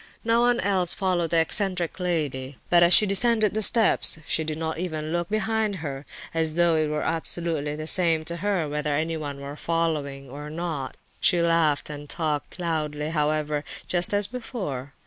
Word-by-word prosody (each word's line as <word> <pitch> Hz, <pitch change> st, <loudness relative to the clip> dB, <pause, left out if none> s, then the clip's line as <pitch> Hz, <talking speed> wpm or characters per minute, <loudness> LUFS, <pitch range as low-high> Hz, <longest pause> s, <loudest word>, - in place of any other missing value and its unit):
No 230 Hz, +1 st, +3 dB
one 240 Hz, 0 st, +3 dB
else 185 Hz, -3 st, +1 dB
followed 180 Hz, -4 st, 0 dB
the 170 Hz, -, +2 dB
eccentric 180 Hz, +1 st, +1 dB
lady; 145 Hz, -7 st, -2 dB
but 175 Hz, -1 st, +6 dB
as 170 Hz, 0 st, +5 dB
she 210 Hz, -, +9 dB
descended 215 Hz, +2 st, +3 dB
the 215 Hz, -, -1 dB
steps 220 Hz, -4 st, +4 dB
she 160 Hz, -, +1 dB
did 155 Hz, -1 st, -4 dB
not 160 Hz, 0 st, -3 dB
even 155 Hz, -3 st, -4 dB
look 170 Hz, 0 st, -2 dB
behind 215 Hz, 0 st, 0 dB
her, 145 Hz, -5 st, -6 dB, 0.3 s
as 160 Hz, -1 st, 0 dB
though 170 Hz, -1 st, +4 dB
it 155 Hz, -1 st, +1 dB
were 150 Hz, 0 st, -2 dB
absolutely 160 Hz, -2 st, -2 dB
the 155 Hz, 0 st, -6 dB
same 165 Hz, -2 st, +2 dB
to 170 Hz, +1 st, -3 dB
her 190 Hz, -3 st, -1 dB
whether 150 Hz, 0 st, -2 dB
anyone 155 Hz, -2 st, -3 dB
were 140 Hz, +1 st, -7 dB
following 150 Hz, -4 st, -2 dB
or 145 Hz, +3 st, -8 dB
not. 155 Hz, -5 st, -5 dB, 0.2 s
She 175 Hz, -, +3 dB
laughed 165 Hz, -3 st, +2 dB
and 145 Hz, 0 st, -9 dB
talked 155 Hz, -3 st, -2 dB
loudly, 155 Hz, -3 st, -2 dB
however, 150 Hz, -1 st, 0 dB, 0.2 s
just 175 Hz, -1 st, +2 dB
as 205 Hz, 0 st, +1 dB
before. 190 Hz, -, -6 dB
165 Hz, 175 wpm, -25 LUFS, 150-180 Hz, 0.3 s, she